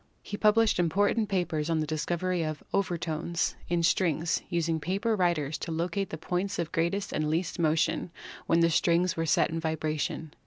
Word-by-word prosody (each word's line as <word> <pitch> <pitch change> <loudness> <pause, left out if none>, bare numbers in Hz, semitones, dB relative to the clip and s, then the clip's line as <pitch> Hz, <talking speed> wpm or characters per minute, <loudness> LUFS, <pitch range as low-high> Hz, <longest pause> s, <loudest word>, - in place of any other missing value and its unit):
He 205 - -5
published 215 -1 +3
important 205 +5 +2
papers 175 -5 -1
on 165 -1 +1
the 155 - 0
discovery 170 +3 -1
of 155 -1 -3
"overtones" 170 -3 -1
in 170 -1 +1
strings, 165 -1 +1
using 165 -1 0
paper 195 +8 0
riders 165 -6 0
to 165 - -5
locate 170 +4 -1
the 160 - -5
points 180 +4 -2
of 170 -1 -2
greatest 180 +5 -1
and 155 0 0
least 165 +3 -1
motion 160 +2 +1 0.4
when 165 0 +3
the 165 0 +4
strings 170 +2 +2
were 165 0 -1
set 155 - +3
in 165 - -2
vibration. 155 -1 -2
170 Hz, 170 wpm, -28 LUFS, 160-185 Hz, 0.4 s, the